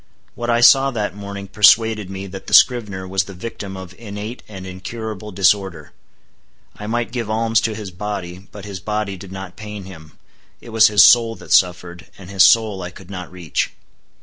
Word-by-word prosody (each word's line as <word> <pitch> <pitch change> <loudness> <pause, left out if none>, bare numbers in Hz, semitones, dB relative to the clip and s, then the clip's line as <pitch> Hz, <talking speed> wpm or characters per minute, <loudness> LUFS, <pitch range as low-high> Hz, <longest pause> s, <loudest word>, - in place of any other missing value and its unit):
What 120 0 -5
I 120 0 +2
saw 135 +2 +6
that 105 -7 -3
morning 100 -1 -7
persuaded 105 0 +4
me 95 0 -6
that 95 0 -10
the - - +4
scrivener 105 -7 +3
was 95 0 0
the 100 - -10
victim 100 -1 -7
of 95 -1 -10
innate 105 +1 -7
and 95 -3 -9
incurable 105 +3 -7
disorder. 95 -4 +1 0.8
I 105 - -8
might 120 +1 -2
give 120 -3 -4
alms 115 +1 +1
to 110 0 -2
his 105 -3 -7
body; 95 -1 -6
but 105 -1 -10
his 100 -2 -7
body 105 0 -3
did 95 0 -11
not 95 -1 -8
pain 105 -2 -8
him; 80 -5 -13 0.5
it - - -13
was 110 -1 +5
his 105 -1 +6
soul 115 -2 +5
that - - -4
suffered, 90 -1 +1
and 95 -1 -12
his 95 -1 +1
soul 110 -4 +5
I 90 - -5
could 95 +1 -14
not 90 -2 -7
reach. 90 -5 -3
100 Hz, 190 wpm, -19 LUFS, 95-110 Hz, 0.8 s, saw